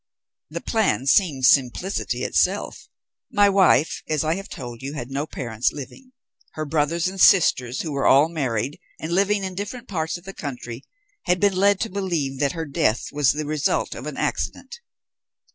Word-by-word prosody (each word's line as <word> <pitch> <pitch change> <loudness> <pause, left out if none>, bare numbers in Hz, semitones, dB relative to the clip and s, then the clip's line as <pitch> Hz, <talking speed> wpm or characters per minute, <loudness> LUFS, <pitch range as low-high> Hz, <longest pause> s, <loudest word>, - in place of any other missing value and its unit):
"The - - -5
plan 220 - 0
seemed 145 -3 +3
simplicity 135 +9 +1
itself. - - 0 0.4
My 205 -4 +5
wife, 185 -6 +3
as 155 -1 +1
I 155 +1 +1
have 195 +3 -6
told 120 -3 -8
you, 135 +2 -5
had 130 -3 -6
no 140 +3 -2
parents 120 -4 -2
living. 255 - -10 0.4
Her 155 - -4
brothers 160 +3 0
and 190 0 -4
sisters, 130 -9 +4
who 160 - -4
were 140 -1 0
all 140 +3 +6
married 135 -5 -2 0.2
and 160 +2 -4
living 200 +2 +2
in 190 -1 -4
different 205 +6 -6
parts 160 -3 -2
of 175 - -16
the 195 +1 -8
country, 125 -5 -7 0.4
had 180 0 +2
been 200 -1 +2
led 200 +1 +3
to 225 - -1
believe 170 -9 -2
that 140 -1 +1
her 165 -1 -4
death 140 -6 0
was 145 -3 +3
the 150 +1 -4
result 150 -1 0
of - - -8
an - - -6
accident. 475 - -3
155 Hz, 180 wpm, -23 LUFS, 135-190 Hz, 0.4 s, all